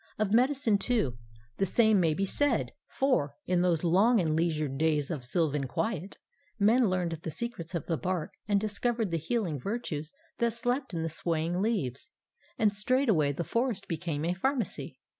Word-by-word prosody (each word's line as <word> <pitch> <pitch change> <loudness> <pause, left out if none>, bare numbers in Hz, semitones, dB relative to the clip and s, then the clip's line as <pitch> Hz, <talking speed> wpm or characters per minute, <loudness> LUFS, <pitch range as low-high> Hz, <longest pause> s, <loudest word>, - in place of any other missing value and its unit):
Of 215 -1 0
medicine, 250 -3 +3
too, 195 - 0 0.4
the 195 - +2
same 220 0 +4
may 165 -3 +2
be 195 - 0
said; 290 +9 +1 0.2
for, 255 - 0
in 180 -1 +1
those 175 -3 +1
long 200 +8 +4
and 160 -4 +1
leisured 155 -4 0
days 150 -2 +1
of 150 -6 -4
sylvan 145 0 0
quiet, 195 - -3 0.4
men 225 +2 +4
learned 180 -2 0
the 165 - -4
secrets 185 -3 -5
of 165 - -3
the 165 - -1
bark 180 -3 -2 0.2
and 205 -1 +3
discovered 215 0 -1
the 165 - +1
healing 170 - -1
virtues 165 - -4 0.3
that 235 -2 +2
slept 245 -1 -1
in 165 - -1
the - - -1
swaying 165 +2 -1
leaves; 200 - -1 0.5
and 215 -3 +3
straightway 210 - +2
the 155 +5 -3
forest 235 +2 -1
became 160 -2 -3
a 175 - +1
pharmacy. 235 +1 -2
185 Hz, 170 wpm, -29 LUFS, 160-230 Hz, 0.5 s, same